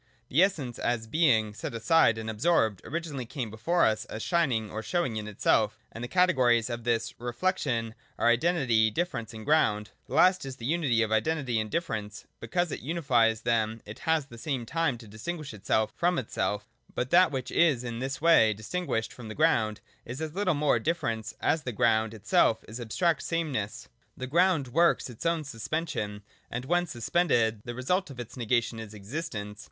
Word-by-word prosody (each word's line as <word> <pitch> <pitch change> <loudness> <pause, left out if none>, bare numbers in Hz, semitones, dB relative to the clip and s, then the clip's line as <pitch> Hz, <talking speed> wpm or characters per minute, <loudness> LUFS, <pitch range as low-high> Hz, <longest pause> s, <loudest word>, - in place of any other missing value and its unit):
The 150 - +4
Essence, 150 -11 0
as 120 -2 -1
Being 110 -6 +2
set 110 +2 -6
aside 115 0 +4
and 110 0 -5
absorbed, 110 - +1
originally 150 -6 -4
came 120 -5 -4
before 120 +12 +2
us 110 +1 +1
as 110 -3 -6
shining 130 - +1
or 110 - -4
showing 170 -3 -1
in 105 -1 -6
self, 105 -1 +2
and 115 - -7
the - - -3
categories 125 -9 +3
of 120 0 -4
this 115 -1 0
re 120 +1 -4
flection 120 -8 -1 0.2
are - - +2
identity, 120 -4 +3
difference 120 -4 -3
and 110 -2 -9
ground. 105 -9 +2 0.2
The 130 - -5
last 185 +4 +5
is 135 -1 -6
the 115 - -8
unity 140 -6 +2
of 110 - -3
identity 125 +1 +1
and 110 0 -3
difference; 105 -9 -3
and - - -38
because 175 +9 -1
it - - -4
unifies 125 -8 +1
them 110 -1 0
it 105 - -9
has 160 -2 +1
at 140 - -24
the 115 - -10
same 130 -3 -3
time 165 -1 0
to 115 -1 -13
distinguish 145 +7 -6
itself 110 +1 0
from 175 +1 +1
itself. 105 -5 -2 0.3
But 125 +1 -2
that 175 -1 +6
which 130 -2 -4
is 150 -8 +3
in 120 -1 -4
this 135 +1 -3
way 150 -10 +5
distinguished 115 - -3
from 120 -3 -10
the 110 - -7
ground 115 -10 +2 0.2
is 125 +4 -7
as 155 -1 -4
little 185 -3 +1
mere 145 -5 +2
difference, 115 -7 -2
as 160 - +2
the 125 - -4
ground 115 -1 +2
itself 110 +1 +2
is 110 +3 -7
abstract 165 +9 0
same 165 -2 -1
ness. 105 -5 -4 0.3
The 130 - -4
ground 165 -1 +2
works 165 -1 +2
its 120 +7 -4
own 165 -2 +1
suspension: 115 -5 -4 0.3
and 120 +2 -4
when 175 +4 +1
suspended, 120 -5 +1
the 120 - -5
result 180 +9 0
of 135 -3 -10
its 120 - -7
negation 120 -1 0
is 110 -1 -8
existence. 105 -2 -6
120 Hz, 190 wpm, -28 LUFS, 110-160 Hz, 0.3 s, that